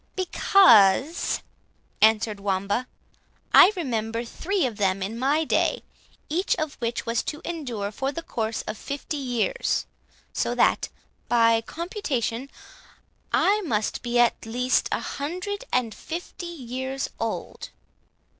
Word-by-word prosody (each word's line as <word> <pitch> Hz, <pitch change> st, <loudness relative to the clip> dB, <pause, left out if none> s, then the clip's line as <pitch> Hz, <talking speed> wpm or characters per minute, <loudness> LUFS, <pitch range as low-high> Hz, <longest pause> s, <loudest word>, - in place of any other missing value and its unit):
"Because," 305 Hz, -, +4 dB, 0.6 s
answered 220 Hz, -1 st, +4 dB
Wamba, 200 Hz, +5 st, -1 dB, 0.7 s
"I 390 Hz, -, +9 dB
remember 230 Hz, -, -2 dB
three 370 Hz, -, -1 dB
of 230 Hz, -5 st, -3 dB
them 195 Hz, -2 st, +1 dB
in 220 Hz, +4 st, -4 dB
my 285 Hz, +5 st, +2 dB
day, -, -, +1 dB, 0.4 s
each 355 Hz, +6 st, +1 dB
of 310 Hz, -4 st, -3 dB
which 235 Hz, -1 st, -2 dB
was 230 Hz, +1 st, 0 dB
to 300 Hz, -, -4 dB
endure 245 Hz, -12 st, -4 dB
for 270 Hz, +5 st, -2 dB
the 335 Hz, +3 st, -6 dB
course 225 Hz, -5 st, -3 dB
of 215 Hz, -, -6 dB
fifty 285 Hz, +2 st, -4 dB
years; 270 Hz, -, -1 dB, 0.5 s
so -, -, -1 dB
that, -, -, +2 dB, 0.4 s
by 230 Hz, -1 st, +4 dB
computation, 275 Hz, -, -3 dB, 0.8 s
I 415 Hz, +2 st, +3 dB
must 220 Hz, -, -1 dB
be 240 Hz, 0 st, -1 dB
at 240 Hz, -1 st, +3 dB
least 250 Hz, +3 st, 0 dB
a -, -, +1 dB
hundred 365 Hz, -, -4 dB
and 245 Hz, -3 st, +1 dB
fifty 345 Hz, -, -7 dB
years 265 Hz, -3 st, -4 dB
old." -, -, -4 dB
255 Hz, 125 wpm, -25 LUFS, 225-320 Hz, 0.8 s, I